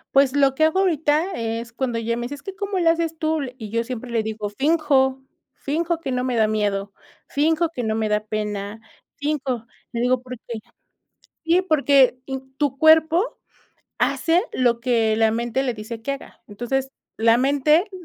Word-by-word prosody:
Pues 275 -1 +5
lo 275 -2 +3
que 315 - +2
hago 315 +4 +3
ahorita 325 -1 +1
es 230 +1 -4
cuando 240 -1 -2
ella 230 0 -1
me 240 - -4
dice: 245 +4 -4
"Es 285 - -14
que 390 - -7
¿cómo 400 -2 -2
le 335 -2 +4
haces 330 -1 0
tú?" 315 -1 0 0.2
Y 220 -4 -7
yo 230 +2 0
siempre 250 0 -6
le 230 -2 0
digo: 215 -1 -4
"Finjo, 270 +1 +2 0.3
finjo 330 +3 -1
que 275 -5 -3
no 250 0 0
me 250 -2 -1
da 220 -1 +4
miedo, 205 -2 -1 0.3
finjo 320 +3 +2
que 285 -7 -5
no 220 -1 0
me 220 -1 0
da 210 0 +1
pena, 210 -1 -4 0.4
finjo", 275 -6 -2 0.2
le 235 - -3
digo, 250 +1 +2
porque 245 -2 -7 0.9
sí 340 +3 +4
porque 280 -7 +4
in 265 0 -7
tu 275 -2 -1
cuerpo 320 +6 +4 0.6
hace 340 +2 +2
lo 240 -2 +2
que 230 -3 +1
la 220 0 +3
mente 240 +3 -1
le 250 -3 -1
dice 220 +1 -7
que 275 +5 -2
haga, 275 - -10
entonces, 250 +5 -2 0.3
la 225 +1 +4
mente, 290 - +3
260 Hz, 185 wpm, -22 LUFS, 230-310 Hz, 0.9 s, Pues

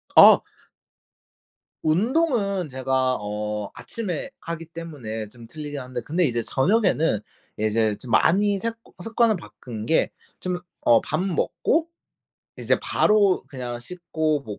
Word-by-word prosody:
아. - - +9 1.4
운동은 200 - +1
제가 130 0 +1
어 105 0 -3
아침에 190 -9 -4
하기 165 0 -5
때문에 145 -10 -6
좀 115 0 -12
틀리긴 150 -1 -6
한데. 125 -1 -5
근데 165 +9 0
이제 120 -4 +1
저녁에는 165 - +2 0.4
이제 110 0 +1
좀 120 +1 -9
많이 200 - +4
색 230 +2 -2 0.3
습관을 225 -2 +2
바꾼 105 0 -8
게 160 - +2 0.3
좀 180 -1 -2 0.3
어 120 -1 +7
밥 155 - -2
먹고 295 - 0 0.7
이제 - - +2
바로 205 -3 +3
그냥 125 -3 -5
씻고 160 -1 -2
뭐 105 -6 -7
155 Hz, 225 characters per minute, -24 LUFS, 120-185 Hz, 1.4 s, 아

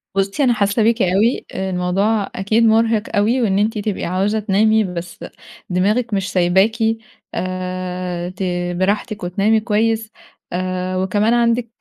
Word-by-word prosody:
بُصّي، 195 +8 0
أنا 245 -2 +4
حاسة 205 +1 +1
بيكِ 230 +1 +2
أوي، 195 +6 +2
آآ، 190 0 -3
الموضوع 195 +4 0
أكيد 215 +4 +1
مرهق 225 -1 +3
أوي، 225 +5 +2
وإن 200 -3 +1
أنتِ 215 +1 0
تبقي 205 -1 -2
عاوزة 195 +5 0
تنامي 215 +2 +3
بس 175 -2 -6 0.5
دماغِك 210 +6 +1
مش 195 -1 -1
سايباكِ 190 +5 +2 0.6
آآ، 185 -1 -4
ت 185 +1 -6 0.4
براحتِك 205 +2 -1
وتنامي 200 +5 +2
كويس، 220 0 0 0.4
آآ، 185 0 -2
وكمان 205 +5 +1
عندِك 235 0 +2
200 Hz, 135 wpm, -19 LUFS, 185-220 Hz, 0.6 s, أنا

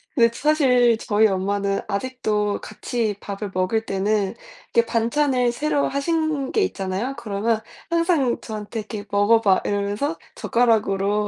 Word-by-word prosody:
근데 235 -2 +4
사실 250 -5 +3
저희 220 0 +3
엄마는 200 0 -1
아직도 210 -2 -1
같이 215 0 -3
밥을 200 -1 -6
먹을 185 +5 0
때는 200 0 0 0.4
이렇게 235 0 +4
반찬을 245 +2 +1
새로 290 +3 0
하신 300 -1 -1
게 430 - +2
있잖아요. 210 - -2
그러면 215 +1 -1 0.3
항상 335 -7 +2
저한테 215 0 -6
이렇게 210 -1 -6
"먹어 205 +3 +4
봐." 195 -4 +3
이러면서 205 +10 -1 0.2
젓가락으로 210 - +1
225 Hz, 310 characters per minute, -22 LUFS, 205-260 Hz, 0.4 s, 근데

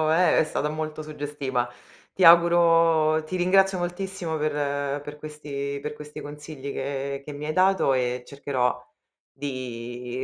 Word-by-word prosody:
è 180 +1 +4
è - - +5
stata 150 -1 -2
molto 155 0 -4
suggestiva. 145 -5 -3 0.4
Ti 190 - 0
auguro 165 -2 +6
ti 185 - -4
ringrazio 190 +1 +3
moltissimo 175 -2 -3
per 150 0 -1 0.5
per 145 +1 -9
questi 140 -2 -5
per 150 - -4
questi 150 0 -9
consigli 145 -1 -7
che 140 0 -3
che 150 - -7
mi 145 +1 -7
hai 155 - -1
dato 185 -2 +3
e 125 -1 -1
cercherò 130 -3 -1 0.5
di 125 -2 -5
150 Hz, 140 wpm, -25 LUFS, 140-165 Hz, 0.5 s, auguro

